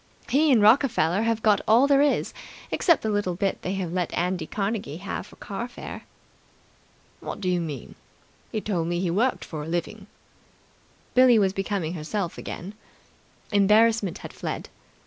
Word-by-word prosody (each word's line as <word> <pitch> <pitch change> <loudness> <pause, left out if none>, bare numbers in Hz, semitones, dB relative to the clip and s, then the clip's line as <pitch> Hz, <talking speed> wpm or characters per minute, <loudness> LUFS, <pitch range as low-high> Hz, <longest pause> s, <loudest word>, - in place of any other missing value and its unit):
He 300 +3 +4
and 230 -5 +5
Rockefeller 215 - +4
have 225 -1 0
got 210 -2 +4
all 230 +5 +6
there 280 -1 +4
is, 290 -1 +1 0.4
except 335 -5 +3
the 220 - 0
little 205 -4 0
bit 195 +2 -1
they 185 - -3
have 180 -3 -3
let 180 -2 -1
Andy 180 -2 -1
Carnegie 195 -7 -3
have 195 +1 -5
for - - -16
car 210 +4 -5
fare." 245 - -9 1.1
"What - - -6
do 195 - -3
you 180 -1 +1
mean? 150 -7 -6 0.6
He 215 - -2
told 175 -6 -1
me 175 0 -1
he 180 -2 0
worked 235 +9 0
for 155 -2 -6
a 150 - -6
living." 175 +5 -4 1.1
Billie 255 -2 +6
was 195 -3 +2
becoming 195 -4 -2
herself 175 +2 -3
again. 190 +4 -7 0.8
Embarrassment 210 -1 +3
had - - -9
fled. - - -5
200 Hz, 165 wpm, -25 LUFS, 175-225 Hz, 1.1 s, all